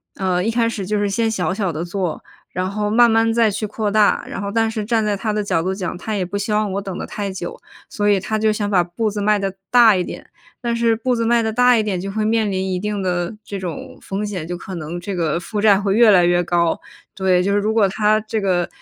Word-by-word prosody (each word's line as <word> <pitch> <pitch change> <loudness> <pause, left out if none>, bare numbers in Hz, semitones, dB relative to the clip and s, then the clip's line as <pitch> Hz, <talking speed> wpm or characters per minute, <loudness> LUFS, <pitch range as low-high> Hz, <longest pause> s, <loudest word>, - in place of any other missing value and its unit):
呃， 185 -2 0
一 210 - 0
开 230 0 +1
始 205 -4 -4
就 210 +1 0
是 205 0 0
先 225 +3 0
小 185 -4 -1
小 195 -3 -1
地 160 +2 -4
做， 175 -2 -3 0.3
然 185 +1 -2
后 210 +1 -2
慢 235 +2 +5
慢 225 0 +3
再 225 -1 +3
去 215 +2 -3
扩 210 0 -2
大， 210 0 +3
然 - - -5
后 200 0 -3
但 225 +1 +1
是 220 -1 -3
站 220 0 +1
在 210 -1 +1
他 215 +2 -2
的 210 0 -1
角 180 -5 0
度 190 +3 -2
讲， 185 -2 -4
他 215 +4 -4
也 190 -3 -1
不 200 +3 -4
希 205 +2 -3
望 210 0 +1
我 200 - -2
等 195 -2 -6
得 - - -4
太 200 -2 -4
久， 180 -2 -6 0.3
所 205 0 -1
以 200 -1 +4
他 215 +3 -2
就 220 0 +2
想 210 -1 -2
把 185 -4 +3
步 210 +5 -2
子 205 0 -4
迈 210 +1 +3
得 195 -1 -2 0.2
大 235 -4 +6
一 180 - 0
点。 - - -8 0.3
但 235 -2 -1
是 230 -1 +2
步 245 +3 0
子 230 - -1
迈 235 0 +3
得 220 0 -1
大 250 +1 +5
一 220 - +2
点， 195 -4 -2
就 195 +1 -5
会 215 +1 -1
面 220 -1 +1
临 190 0 -1
一 180 - -1
定 210 +1 -3
的 175 +1 -1
这 200 - -5
种 175 -4 -7
风 195 +2 -4
险， 190 -6 -4
就 175 0 -4
可 190 - -9
能 165 +1 -5
这 195 +2 -5
个 170 -2 0
负 205 +4 -4
债 205 -2 +5
会 200 -1 0
越 235 0 +6
来 180 -4 +6
越 175 0 +2
高。 170 -1 +1 0.4
对， 185 -2 +2
就 200 - 0
是 205 - +3
如 210 +2 0
果 220 -3 +4
他 215 +2 +2
这 215 0 -3
个 180 -3 +1
205 Hz, 295 characters per minute, -20 LUFS, 185-220 Hz, 0.4 s, 大